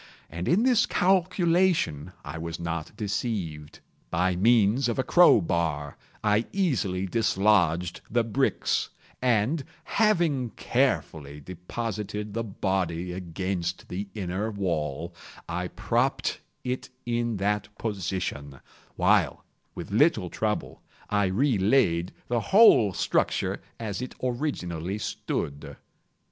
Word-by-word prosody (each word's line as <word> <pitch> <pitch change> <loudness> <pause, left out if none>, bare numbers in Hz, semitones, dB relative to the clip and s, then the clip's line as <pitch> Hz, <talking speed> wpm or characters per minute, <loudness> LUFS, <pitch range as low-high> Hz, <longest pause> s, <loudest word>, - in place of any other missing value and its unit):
And 85 +2 -4
in 190 +7 +3
this 245 -3 +4
calculation 175 - +2
I 80 - -6
was 85 0 -5
not 85 -2 -4
deceived. 100 -8 -3 0.3
By 90 +2 +1
means 115 +5 +3
of 115 - -2
a 130 - +1
crow 175 -6 +6
bar 80 -4 -1 0.3
I 105 +1 +2
easily 120 - 0
dislodged 95 -5 +2
the 120 +1 +2
bricks, 125 +4 0 0.3
and, 125 +5 +2 0.2
having 170 - +2
carefully 80 - -1
deposited 105 +5 -5
the 115 +1 -1
body 90 -4 -2
against 90 0 -4
the 100 +3 -4
inner 100 +2 -2
wall, 85 -5 -2 0.3
I 90 +2 -2
propped 115 +8 0 0.2
it 125 +1 -3 0.2
in 120 -2 -1
that 105 +1 0
position, 90 - -3 0.4
while, - - +2 0.3
with - - -7
little - - +3
trouble, - - -2 0.3
I 105 -1 +3
re 110 +5 +1
laid 95 -5 +2 0.2
the 120 -1 +1
whole 115 - +6
structure - - 0 0.2
as 110 -1 -4
it 125 - -6
originally 100 - -2
stood. 70 -8 -4
100 Hz, 110 wpm, -27 LUFS, 85-120 Hz, 0.4 s, crow